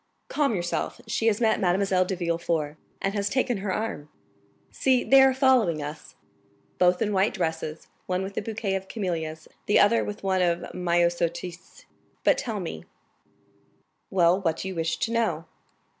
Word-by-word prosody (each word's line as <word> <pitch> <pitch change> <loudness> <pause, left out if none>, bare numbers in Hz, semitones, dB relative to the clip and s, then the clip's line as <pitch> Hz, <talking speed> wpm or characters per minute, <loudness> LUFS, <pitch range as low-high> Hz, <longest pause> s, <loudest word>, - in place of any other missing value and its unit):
"Calm 280 -7 +1
yourself. 175 -1 -2
She 225 - -1
has 215 -2 +2
met 220 -2 +2
Mademoiselle 185 0 +2
de 190 - -2
Villefort, 170 -3 -1 0.3
and 195 - 0
has 205 -1 -1
taken 250 -1 0
her 195 0 -3
arm; 185 -8 -3 0.6
see, 260 -2 +2
they 270 0 +6
are 265 0 +6
following 255 - +3
us, 150 +1 -8 0.6
both 180 0 +4
in 210 -1 -1
white 195 +2 +2
dresses, 160 -1 -3 0.2
one 185 +1 -1
with 195 +1 -6
a - - -1
bouquet 210 -2 -3
of 190 0 -3
camellias, 160 -7 -4 0.2
the 205 - +4
other 230 +3 +4
with 205 0 -6
one 190 -1 +1
of 175 -1 0
myosotis. 175 0 -1 0.4
But - - +4
tell 220 -4 -3
me——" 165 - -6 1.2
"Well, 180 0 +3
what 165 -3 0
do 190 - -4
you - - -5
wish 165 -1 -1
to 225 - -2
know?" 215 -9 0
185 Hz, 165 wpm, -26 LUFS, 170-210 Hz, 1.2 s, they